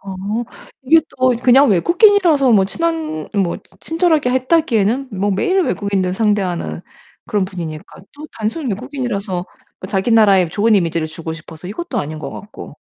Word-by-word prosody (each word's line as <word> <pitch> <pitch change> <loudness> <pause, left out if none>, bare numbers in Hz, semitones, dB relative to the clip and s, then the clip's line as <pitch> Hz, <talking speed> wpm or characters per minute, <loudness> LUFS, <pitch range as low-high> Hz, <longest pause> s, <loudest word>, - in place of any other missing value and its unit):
아 195 - -9 0.7
이게 320 +5 +5 0.2
또 255 -1 +3
그냥 265 +3 +6
외국인이라서 340 - +4
뭐 200 -3 +5
친한 320 - -3
뭐 190 -4 0
치 - - -27
친절하게 325 -5 +1
했다기에는 260 -3 +1
뭐 205 +2 +1
매일 370 - +1
외국인을 195 - -1
상대하는 195 -6 -1 0.5
그런 210 -4 0
분이니까 170 -3 -8
또 300 +2 -10
단순히 230 +7 -3
외국인이라서 210 -6 -4 0.4
자기 195 +4 -1
나라에 200 -6 +5
좋은 215 +5 +2
이미지를 165 -4 0
주고 160 +1 -7
싶어서 160 +1 -11
이것도 250 - -4
아닌 155 -2 -4
거 - - -6
같고. 205 +2 -10
210 Hz, 360 characters per minute, -18 LUFS, 185-275 Hz, 0.7 s, 그냥